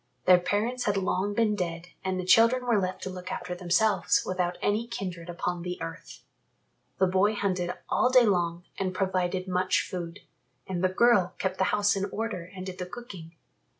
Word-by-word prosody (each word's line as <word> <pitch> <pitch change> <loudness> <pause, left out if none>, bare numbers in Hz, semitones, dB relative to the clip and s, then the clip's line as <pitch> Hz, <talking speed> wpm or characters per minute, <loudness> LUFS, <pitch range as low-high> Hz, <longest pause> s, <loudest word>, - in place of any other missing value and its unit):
Their 180 -1 +7
parents 225 +7 -1
had 205 -1 +1
long 195 +1 0
been 215 -2 +2
dead 170 -2 -4
and 190 -1 -1
the 185 - -3
children 230 +7 +5
were 230 -5 +3
left 185 0 -3
to - - -3
look 180 0 -7
after 180 0 -4
themselves 180 +4 +2
without 180 -1 -1
any 215 +3 0
kindred 180 -7 -6
upon 175 0 -3
the 180 +1 -5
earth. 165 +1 -8 0.7
The 190 - +4
boy 190 +3 +2
hunted 185 -3 -1
all 250 - +2
day 255 -1 +6
long 175 -4 0 0.2
and 185 -1 -2
provided 185 -1 -1
much 185 0 +1
food, 175 0 -6 0.4
and 185 -1 -3
the 185 - +4
girl 190 -3 +3
kept 190 -1 -2
the 190 - +3
house 205 +1 +2
in 195 0 -1
order 200 -4 -4
and 185 0 -6
did 185 -1 -7
the 180 - -4
cooking. 180 -7 -10
185 Hz, 185 wpm, -28 LUFS, 180-205 Hz, 0.7 s, Their